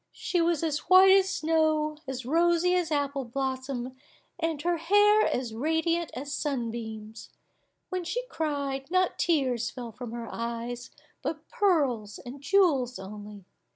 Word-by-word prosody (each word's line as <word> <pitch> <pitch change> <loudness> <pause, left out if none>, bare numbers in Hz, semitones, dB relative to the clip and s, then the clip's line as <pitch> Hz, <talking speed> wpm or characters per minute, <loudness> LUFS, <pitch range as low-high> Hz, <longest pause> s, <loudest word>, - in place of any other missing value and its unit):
She 355 - -1
was 335 -2 +1
as 305 -2 0
white 375 +1 +8
as 385 0 +5
snow, 310 -2 +1
as 260 -2 -5
rosy 345 +4 +3
as 355 -3 0
apple 280 -2 0
blossom, 260 0 -3 0.4
and 325 -3 -1
her 345 0 +1
hair 410 +5 +4
as 245 -3 -2
radiant 320 +6 0
as 285 +2 -5
sun 260 -6 -2
beams. 220 -1 -8 0.6
When 370 -1 -2
she 480 +9 -3
cried, 285 - -3
not 370 0 +1
tears 260 -8 +1
fell 240 -3 -7
from 235 +1 -8
her 235 0 -6
eyes, 235 +1 -4 0.3
but 310 0 -4
pearls 285 - +1
and 265 +2 -10
jewels 280 -8 +2
only. 205 0 -9
285 Hz, 145 wpm, -28 LUFS, 245-340 Hz, 0.6 s, white